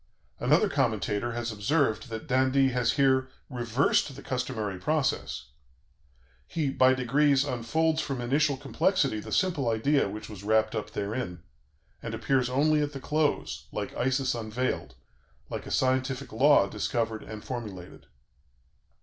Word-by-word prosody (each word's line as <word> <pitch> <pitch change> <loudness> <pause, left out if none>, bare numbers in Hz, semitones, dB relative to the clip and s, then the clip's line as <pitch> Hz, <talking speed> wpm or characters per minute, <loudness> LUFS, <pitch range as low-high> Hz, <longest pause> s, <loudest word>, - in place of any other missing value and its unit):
Another - - +3
commentator 115 +4 0
has 120 0 -3
observed 115 +3 0
that 110 -1 -6
d'Indy 130 +1 +3
has 125 -2 +1
here 130 -2 +3 0.2
"reversed 125 +3 +1
the 140 - -10
customary 110 -7 -3
process.... 150 - -1 1.0
He 150 -5 -1
by 130 0 +4
degrees 140 +2 +3
unfolds 155 +6 0
from 135 -3 -3
initial 140 +3 +1
complexity 145 - +1
the - - -8
simple 170 -10 +1
idea 125 +2 +2
which 105 +2 -7
was 100 -3 -10
wrapped 110 +1 +2
up - - -4
therein, 100 -4 -4 0.6
and - - -4
appears 130 -2 +1
only 150 +4 +3
at 145 0 -2
the 135 - -5
close, 150 +2 -1
like - - -4
Isis 130 +1 +1
unveiled, 110 - -3 0.6
like - - -5
a - - -6
scientific 130 +1 0
law 140 0 +5
discovered 110 +2 -2
and 110 -1 -9
formulated." 105 -8 -7
130 Hz, 135 wpm, -28 LUFS, 110-140 Hz, 1.0 s, law